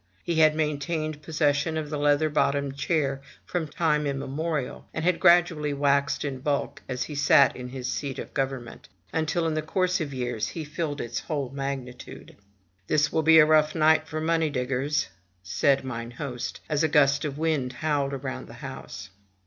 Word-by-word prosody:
He 170 -2 -1
had 155 -1 +6
maintained 155 0 -2
possession 155 0 0
of 155 -1 -4
the 150 - -2
leather 145 +1 +3
bottomed 140 -2 0
chair 140 -2 0 0.2
from 170 -3 -2
time 150 -1 +1
immemorial; 140 +1 -3
and 160 - -2
had 180 -1 +2
gradually 170 -4 +4
vvaxed 140 0 +1
in 135 -2 -4
bulk 140 +1 -2
as 125 -1 -2
he 150 - -7
sat 145 -1 +5
in 125 -1 -6
his 125 -1 -5
seat 135 +1 -3
of - - -7
government, 135 -7 -4 0.2
until 160 +1 0
in 160 - 0
the 155 - 0
course 180 +3 0
of 150 -3 -3
years 120 -4 -2
he 165 - -5
filled 150 -1 -3
its 120 0 -3
whole 140 -5 -3
magnitude. 135 -2 -6 0.5
"This 150 -1 +2
will 160 - +1
be 160 +1 +6
a 155 - +9
rough 155 -1 +3
night 160 0 +4
for 155 - -4
the 155 - -3
money 165 -1 +2
diggers, 135 0 -1 0.2
'* 90 +1 -42
said 95 +12 +2
mine 115 -2 -5
host, 125 0 -5
as 150 -2 0
a - - +4
gust 140 -2 +3
of 145 -2 -3
wind 150 -5 0
howled 140 -1 -1
round 130 - -5
the - - -11
house. 95 +5 -8
145 Hz, 185 wpm, -26 LUFS, 135-155 Hz, 0.5 s, a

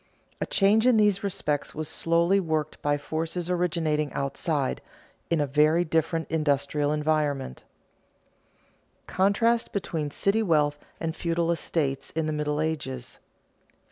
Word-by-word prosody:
A - - -1
change 215 +4 +3
in 250 -3 +5
these 205 -2 +3
respects 150 -7 -2
was 155 0 -4
slowly 170 +6 +2
worked 155 -4 -2
by 145 0 +1
forces 165 +4 -3
originating 160 -4 0
outside, 140 +1 -1 0.5
in 170 - +2
a 145 - +2
very 155 +5 +3
different 160 0 0
industrial 145 -1 +1
environment. 150 - 0 1.4
[Sidenote: - - -42
Contrast 225 +5 +2
between 160 -6 -2
city 200 +8 +1
wealth 150 -6 +2 0.2
and 165 0 -3
feudal 170 -1 0
estates 145 -5 -1
in 160 0 -2
the 155 - -1
Middle 150 0 -1
Ages] 140 -6 -3
4. - - -39
160 Hz, 135 wpm, -26 LUFS, 150-175 Hz, 1.4 s, in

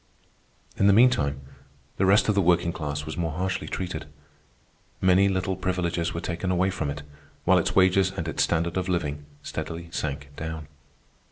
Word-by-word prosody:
In 100 - +4
the 100 - +6
meantime, 75 - +4 0.6
the 95 - +2
rest 100 +2 +5
of 105 - +3
the 100 - +3
working 85 -1 +2
class 75 -2 -4
was 75 0 -6
more 80 -3 -1
harshly 95 +3 -2
treated. 90 -1 -4 0.9
Many 95 +1 +4
little 95 0 -1
privileges 90 -2 -1
were 85 - -4
taken 85 +2 -3
away 95 +1 +2
from 80 -5 -2
it, 75 +1 -5 0.4
while - - +5
its - - -1
wages 95 0 +5
and 80 - -3
its 80 - -1
standard 85 +1 +1
of 95 0 -1
living 75 -5 -2 0.2
steadily 85 +1 -5
sank 70 -4 -4
down. 80 -1 -5
85 Hz, 170 wpm, -26 LUFS, 80-95 Hz, 0.9 s, the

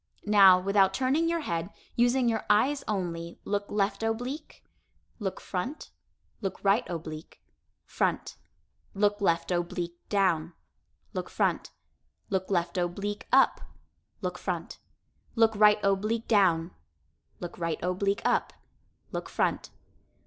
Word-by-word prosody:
Now, 195 -3 +7
without 195 0 +3
turning 280 +6 +1
your 335 0 0
head, 170 - -3 0.3
using 245 +1 +3
your 225 -2 0
eyes 270 +7 +3
only, 170 -4 -3
look 205 0 -1
left 200 0 0
oblique, 245 +7 -4 0.6
look 195 -3 -3
front, 235 +11 -5 0.5
look 195 -3 -3
right 200 +5 +4
oblique, 160 -2 -7 0.4
front, - - -1 0.6
look 205 +1 +1
left 170 -2 +1
oblique 175 0 -2
down, 180 -5 +1 0.6
look - - -4
front, - - 0 0.6
look 190 -1 -1
left 180 -1 0
oblique 200 +4 -3
up, - - +4 0.6
look - - -3
front, - - -4 0.6
look 225 -1 +4
right 210 0 +6
oblique 215 +4 0
down, 180 -6 +3 0.7
look 175 - -7
right 165 -2 -1
oblique 195 +3 0
up, - - +1 0.6
look - - -5
front. - - -1
200 Hz, 120 wpm, -28 LUFS, 175-220 Hz, 0.7 s, Now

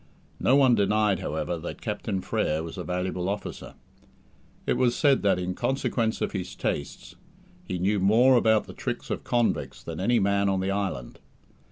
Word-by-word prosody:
No 130 - +4
one 135 -3 +5
denied, 105 -2 +2
however, 80 +3 -3
that 85 - -7
Captain 105 -2 -2
Frere 80 -2 -1
was 80 - -7
a - - -5
valuable 90 0 -2
officer. 100 +1 -5 0.9
It - - +2
was 125 -2 +2
said 140 -3 +3
that, 100 -3 +3
in 90 0 -2
consequence 115 0 -1
of - - -1
his 90 -3 -5
tastes, 70 - -4 0.5
he 90 - -2
knew 100 +3 +1
more 115 +7 +5
about 110 -3 +3
the - - -10
tricks - - -5
of - - -3
convicts 120 -2 -1
than - - -6
any 120 +6 +2
man 100 0 +2
on 95 -1 +1
the 95 +1 -1
island. 95 -12 -3
100 Hz, 175 wpm, -26 LUFS, 90-115 Hz, 0.9 s, one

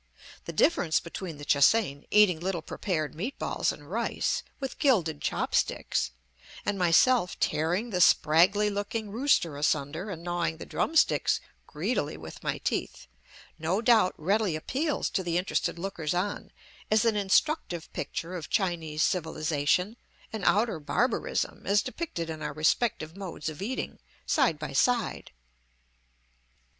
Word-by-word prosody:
The - - -4
difference 165 - +2
between 170 -1 -7
the 145 - -9
Che 140 - +2
hsein, 145 -3 +3
eating 205 -6 +5
little 175 -2 -2
prepared 155 -6 -3
meatballs 215 - -2
and - - -11
rice, - - -1 0.2
with 270 -2 -5
gilded 175 - +2
chop - - -2
sticks, - - 0 0.6
and 205 -1 -1
myself 180 +4 +3
tearing 180 +10 0
the 180 -2 0
spraggly 185 +8 +5
looking 205 +1 -3
rooster 225 - +1
asunder 150 +5 -1
and 170 -4 -6
gnawing 170 -2 -1
the - - -8
drum 325 - -2
sticks - - +3 0.3
greedily 160 - -2
with 80 0 -10
my - - -1
teeth, - - -3 0.5
no 165 +5 0
doubt 225 -5 +4
readily 195 +2 +1
appeals 280 - -1
to 190 - 0
the 175 -2 -1
interested 180 -1 -1
lookers 175 -3 -3
on 200 +3 -2 0.4
as 215 +2 +3
an 225 -2 +3
instructive 200 - +1
picture 170 +2 -4
of 160 -5 -6
Chinese 165 -5 0
civilization 160 +4 0 0.4
and 220 - -4
outer 210 -5 +2
barbarism 210 - -1
as 200 +1 +3
depicted 255 - -4
in 160 -1 -6
our - - -3
respective 160 +1 0
modes 185 -6 -5
of 155 +3 -9
eating, 245 +6 -4 0.3
side 265 - +2
by 150 -2 -6
side. 235 - +1
180 Hz, 140 wpm, -28 LUFS, 160-215 Hz, 0.6 s, eating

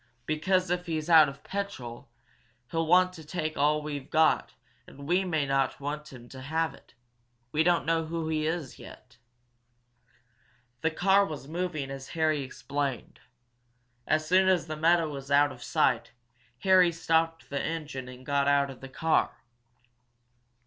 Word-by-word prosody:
"Because 180 +5 +1
if 180 0 -1
he's 160 0 -2
out 155 -3 +8
of 140 +1 -12
petrol, 130 -14 -6 0.6
he'll 165 -1 0
want 185 +2 +5
to 165 -3 -11
take 155 0 -3
all 150 +1 +2
we've 145 -3 -6
got 160 0 +2 0.3
and 140 +1 -11
we 180 +3 +2
may 160 -6 0
not 135 -1 0
want 150 +2 -5
him 120 -2 -12
to 130 - -10
have 160 +4 -1
it. - - -19 0.6
We 155 - +2
don't 175 +1 +2
know 165 0 0
who 165 0 -3
he 155 -1 0
is, 160 -5 -4
yet." - - -14 1.6
The 160 - +2
car 195 +5 +3
was 150 -7 -6
moving 160 -4 -3
as 135 0 -7
Harry 155 -2 +2
explained. 135 -1 -4 0.9
As 155 0 +1
soon 185 +2 +4
as 180 -4 +2
the 155 -1 -5
meadow 165 +1 +3
was 140 -2 -7
out 145 +1 +4
of - - -12
sight, 125 -7 +1 0.5
Harry 185 -2 +5
stopped 165 -1 0
the 140 - -1
engine 150 -6 -4
and 125 0 -11
got 140 0 +1
out 140 -1 +3
of 130 - -13
the 135 - -9
car. 160 -1 0
155 Hz, 160 wpm, -28 LUFS, 140-165 Hz, 1.6 s, out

